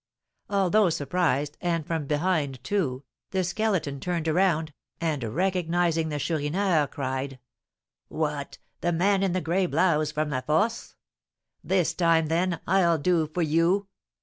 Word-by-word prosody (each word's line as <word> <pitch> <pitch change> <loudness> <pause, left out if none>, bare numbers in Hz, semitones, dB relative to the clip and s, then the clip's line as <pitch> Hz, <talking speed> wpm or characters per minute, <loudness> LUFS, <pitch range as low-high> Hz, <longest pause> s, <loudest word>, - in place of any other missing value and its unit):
Although 200 0 +3
surprised, 150 -2 0
and 170 -4 -1
from 160 -3 -3
behind 150 -4 0
too, 140 -7 -1 0.3
the 190 -1 0
Skeleton 185 -7 -1
turned 170 0 -2
around, 160 -2 +1 0.3
and, 155 -6 -1
recognising 170 - 0
the 150 - -2
Chourineur, 160 +2 +1
cried, 135 -1 -4 0.7
"What! 150 -3 -3 0.2
the 175 - 0
man 195 +4 +2
in 195 -3 +1
the 185 - 0
gray 180 +3 +1
blouse 155 -5 +2
from 150 0 -2
La 130 -2 -1
Force? 160 - 0 0.7
This 185 -3 +1
time, 165 -2 +2
then, 170 0 0
I'll 175 -3 +3
do 165 0 +1
for 165 +3 -2
you!" 170 +6 +2
165 Hz, 135 wpm, -26 LUFS, 150-185 Hz, 0.7 s, Although